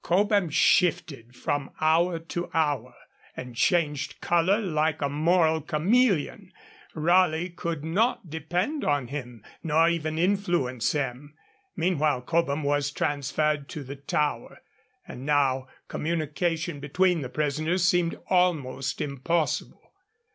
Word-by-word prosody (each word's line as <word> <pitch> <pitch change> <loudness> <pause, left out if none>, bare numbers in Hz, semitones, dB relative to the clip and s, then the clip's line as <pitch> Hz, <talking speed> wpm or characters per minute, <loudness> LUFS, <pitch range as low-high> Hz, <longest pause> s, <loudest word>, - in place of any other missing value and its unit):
Cobham 200 0 +2
shifted 150 -7 +1
from 145 +1 -2
hour 165 +2 +3
to 165 +1 -5
hour, 145 -6 0 0.4
and 125 -2 -7
changed 150 -1 0
colour 175 +4 +2
like 160 -5 0
a 145 - 0
moral 160 +2 +2
chameleon; 190 - +1 0.4
Raleigh 175 +1 +2
could 170 -3 -4
not 190 +5 0
depend 175 - -2
on 145 -4 0
him, 125 -6 -7 0.2
nor 160 +1 +3
even 160 -2 -2
influence 175 - 0
him. 145 0 -4 0.4
Meanwhile 155 -7 +1
Cobham 155 0 0
was 145 0 +1
transferred 145 0 -1
to 150 - -6
the 135 +2 -7
Tower, 140 -2 -2 0.4
and 125 - -8
now 135 -2 +1 0.2
communication 160 0 -2
between 175 +4 +1
the 130 - -5
prisoners 155 +6 0
seemed 175 -2 +1
almost 155 -8 0
impossible. 150 +4 -2
155 Hz, 115 wpm, -26 LUFS, 145-175 Hz, 0.4 s, hour